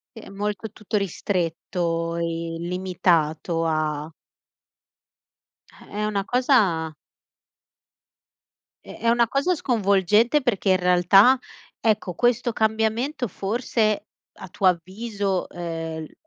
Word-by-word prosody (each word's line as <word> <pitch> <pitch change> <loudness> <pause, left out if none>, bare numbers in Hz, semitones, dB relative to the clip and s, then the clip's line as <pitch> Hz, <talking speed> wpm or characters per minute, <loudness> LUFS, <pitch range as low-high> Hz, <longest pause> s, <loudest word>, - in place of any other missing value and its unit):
Sì, 225 - -9
è - - -12
molto 205 +2 -4
tutto 215 +1 -3
ristretto 170 -2 -2
e 170 - -2 0.4
limitato 170 -2 0
a 155 -1 -1 1.6
Eh, - - -18
è 210 +1 -3
una 200 -2 -1
cosa 200 - +2 1.9
È - - -11
è 230 - -1
una 235 0 +3
cosa 280 +8 +1
sconvolgente 220 - +2
perché, 205 -6 0
in 185 - +5
realtà, 180 +7 +5 0.4
ecco, 215 -5 0
questo 240 +2 +1
cambiamento 220 +5 0
forse, 215 +2 -1 0.3
a 190 - -9
tuo 190 +2 -1
avviso, 195 +2 -1
ehm, 165 -2 -5
l - - -14
195 Hz, 105 wpm, -24 LUFS, 170-225 Hz, 1.9 s, in